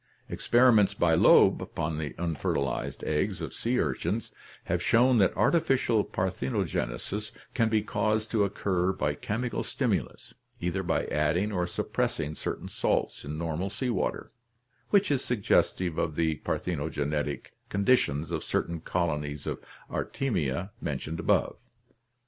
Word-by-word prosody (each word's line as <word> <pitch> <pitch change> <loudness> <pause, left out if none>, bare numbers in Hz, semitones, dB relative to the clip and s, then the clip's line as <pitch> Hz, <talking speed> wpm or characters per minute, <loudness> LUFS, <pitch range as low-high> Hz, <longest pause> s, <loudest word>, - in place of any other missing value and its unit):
Experiments 120 -5 +4
by - - +3
Loeb - - +6
upon 75 0 -3
the 70 -5 -4
unfertilized 75 -5 -2
eggs 85 +6 0
of - - -5
sea 120 +2 -1
urchins 85 - -1 0.3
have - - -1
shown 125 +1 +4
that 95 - +3
artificial 135 -9 +3
parthenogenesis 95 - -2 0.2
can 115 -2 +2
be 110 -1 +2
caused 110 +1 0
to 110 -3 +3
occur 95 -2 0
by 75 -5 0
chemical 115 - -3
stimulus, - - -2 0.3
either 90 +2 -1
by 90 - 0
adding 80 +8 +1
or 90 -3 0
suppressing 80 -3 -2
certain - - -4
salts - - -1
in 75 +2 -5
normal 85 +3 -2
sea 125 +5 -2
water, 105 - -2 0.6
which 200 -5 +3
is 135 -2 +1
suggestive 95 -6 +1
of 80 -3 -1
the 80 -1 +1
parthenogenetic 75 -3 -2 0.2
conditions 100 - +2
of - - -2
certain 85 -1 -1
colonies 75 -4 -2
of - - -4 0.2
Artemia 90 - -2
mentioned 80 +1 -3
above. - - +1
90 Hz, 130 wpm, -28 LUFS, 75-110 Hz, 0.6 s, Loeb